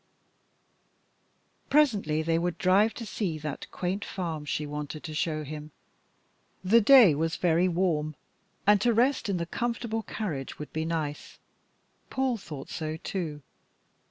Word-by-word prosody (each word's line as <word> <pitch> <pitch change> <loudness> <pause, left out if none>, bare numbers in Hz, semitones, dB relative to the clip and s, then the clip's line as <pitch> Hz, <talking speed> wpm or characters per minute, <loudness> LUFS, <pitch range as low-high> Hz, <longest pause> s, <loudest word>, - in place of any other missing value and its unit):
Presently 205 - +3
they 165 0 +1
would 175 0 -1
drive 195 +4 +3
to 230 - -6
see 190 -5 -2
that 150 -2 -6
quaint 185 +3 -3
farm 165 -5 -4
she 150 +1 -2
wanted 150 +1 -5
to 155 - -6
show 155 0 -1
him. 150 +1 -7 0.9
The 225 +5 +5
day 235 - +8
was 160 +3 -1
very 175 +1 +2
warm, 165 -4 0 0.5
and 205 -1 +5
to 235 0 +3
rest 245 -1 +2
in 195 - +1
the 170 - -2
comfortable 230 +3 -2
carriage 170 -11 -5
would 150 - -8
be 160 0 -1
nice. 155 -3 -3 0.7
Paul 260 -2 0
thought 150 -9 -9
so, 155 0 -3
too. 160 -5 -4
170 Hz, 140 wpm, -28 LUFS, 155-210 Hz, 0.9 s, day